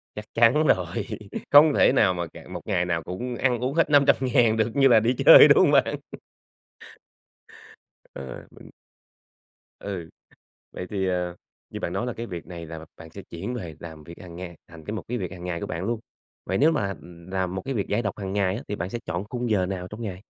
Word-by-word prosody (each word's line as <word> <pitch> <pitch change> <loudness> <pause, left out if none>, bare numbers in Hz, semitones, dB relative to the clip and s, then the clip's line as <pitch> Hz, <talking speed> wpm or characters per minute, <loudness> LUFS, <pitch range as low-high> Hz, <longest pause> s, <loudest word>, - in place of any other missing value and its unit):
Chắc 105 - -6
chắn 120 +7 +4
rồi. 90 -5 +1 0.5
Không 145 +1 +8
thể - - +5
nào 95 -4 +3
mà 85 -1 -3
cà - - -13
một - - -6
ngày 90 - +1
nào 85 -2 -1
cũng 120 +7 -5
ăn 125 -3 +1
uống 130 +4 -2
hết 165 -2 +2
500.000 130 -5 +4
được 110 0 +1
như 135 -1 +6
là 115 -3 +6
đi 120 +3 +1
chơi, - - +11
đúng - - +6
hông - - +5
bạn? - - +3 2.2
Ờ, 65 -2 -9
mình - - -15 1.1
Ừ. 90 -5 -6 0.6
Vậy 90 - -6
thì, 95 -2 -1
à, 90 -1 -2 0.4
như - - -7
bạn - - -3
nói 120 - -2
là 125 - -2
cái 115 +1 -6
việc 85 -4 -7
này 85 -2 -8
là 80 0 -8
bạn 80 -1 -12
sẽ 100 - -10
chuyển 95 +9 -5
về 85 -9 -6
làm 80 -3 -10
việc 85 - -10
hằng 85 -2 -11
ngày 90 -2 -8
thành 80 -2 -13
cái 105 - -5
một 110 - -4
cái 125 0 -2
việc 95 -1 -5
hằng 90 -1 -9
ngày 85 -2 -3
của - - -4
bạn 85 +2 -4
luôn. 115 +1 -2 0.5
Vậy 95 - -1
nếu 155 +3 +4
mà 100 -9 -1 0.4
làm 95 -1 -2
một 95 - -4
cái 135 - -3
việc 100 - -1
giải 110 +4 0
độc 100 0 -4
hằng 95 -1 -4
ngày 100 -2 +1
á 125 - -6
thì 105 - -3
bạn 90 +3 -4
sẽ 120 - -4
chọn 85 +4 -3
khung 120 0 -3
giờ 95 -4 +2
nào 90 -1 -5
trong 110 +3 -8
ngày? 95 -4 -5
95 Hz, 230 wpm, -25 LUFS, 90-120 Hz, 2.2 s, chơi